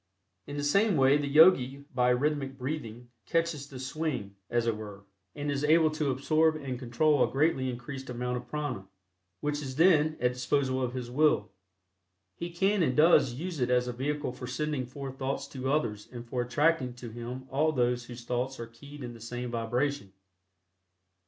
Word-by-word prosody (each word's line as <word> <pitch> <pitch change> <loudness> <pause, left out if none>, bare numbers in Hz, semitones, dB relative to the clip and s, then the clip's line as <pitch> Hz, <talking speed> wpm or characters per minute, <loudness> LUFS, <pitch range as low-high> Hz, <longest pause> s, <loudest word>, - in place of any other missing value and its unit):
In 145 - -5
the 145 - -2
same 200 +5 +3
way 135 +1 +5
the 145 -1 -2
Yogi 140 -3 +5
by 125 -1 +3
rhythmic 135 +1 0
breathing 125 -4 -5 0.2
"catches 165 -4 0
the 135 - -9
swing," 130 -7 -3
as 120 -1 +1
it 115 -2 +1
were, 105 -2 -9 0.3
and 145 0 -2
is 140 0 -2
able 155 +1 +5
to 155 -2 -1
absorb 155 +4 +2
and 135 -5 -5
control 140 +5 +2
a - - 0
greatly 135 -2 +1
increased 130 +2 -7
amount 125 0 -2
of 125 0 -8
prana, 145 -8 -4 0.5
which 150 0 -1
is 130 -2 -5
then 155 -1 +5
at - - -17
the 125 - +3
disposal 130 +1 0
of 125 0 -2
his 125 -1 -5
will. 130 -7 +2 0.8
He 170 - -5
can 195 +3 +1
and 130 -5 +1
does 150 -5 +5
use 165 +2 -5
it 125 -1 +1
as 125 0 +2
a 125 - -3
vehicle 145 +2 -2
for 125 0 -8
sending 140 0 -2
forth 135 0 -7
thoughts 135 +1 -2
to 130 -1 -3
others 105 -9 -1
and 120 -1 -8
for 125 +1 -1
attracting 130 +1 +1
to 120 -2 -8
him 120 +3 -6
all 155 +4 +2
those 125 -3 0
whose 120 0 -9
thoughts 125 +2 -2
are 115 - -4
keyed 140 +5 -12
in 120 -1 -6
the 115 - -13
same 120 +1 -5
vibration. 120 -1 -1
130 Hz, 190 wpm, -29 LUFS, 125-150 Hz, 0.8 s, way